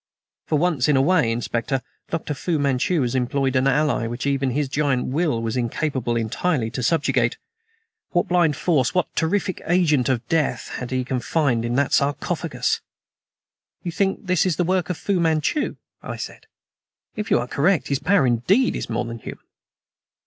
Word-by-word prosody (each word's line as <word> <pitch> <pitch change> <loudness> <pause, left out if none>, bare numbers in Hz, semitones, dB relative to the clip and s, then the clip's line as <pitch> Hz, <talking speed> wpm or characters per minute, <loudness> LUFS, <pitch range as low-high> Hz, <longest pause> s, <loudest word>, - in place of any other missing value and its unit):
"For 155 - +2
once 155 -5 +1
in 145 -2 +4
a - - +4
way, 160 -7 +3
Inspector, 120 +3 -1 0.3
Dr. 160 -2 -2
Fu 160 +4 -1
Manchu 140 +3 +1
has 120 - -1
employed 130 +1 0
an 130 +1 +3
ally 140 -4 +2
which 120 +3 -4
even 140 -1 +1
his 140 +3 0
giant 135 -3 0
will 145 -3 0
was 115 +1 -2
incapable 125 0 -1
entirely 115 +2 0
to 125 - -4
subjugate. 130 -3 +1 0.7
What 175 - +1
blind 175 -4 +3
force 150 -1 +1
what 180 -3 0
terrific 185 +2 0
agent 155 -7 +3
of 120 -2 -1
death 160 -1 0
had 125 - -5
he 130 0 -1
confined 130 -1 0
in 120 +1 -1
that 140 0 +1
sarcophagus!" 140 +1 0 1.0
"You 175 - -3
think 195 +4 -1
this 180 -3 +2
is 185 -4 +1
the 175 - +1
work 185 +1 0
of 180 - -2
Fu 195 -3 0
Manchu?" 165 - +1 0.3
I - - -6
said. - - -8 0.7
"If 210 0 -4
you - - +4
are 120 +1 -2
correct, 160 +7 +1
his 140 -1 +1
power 185 -3 +3
indeed 130 - +2
is - - -4
more 120 +1 -1
than 115 0 -6
human." - - -9
140 Hz, 175 wpm, -23 LUFS, 125-170 Hz, 1.0 s, in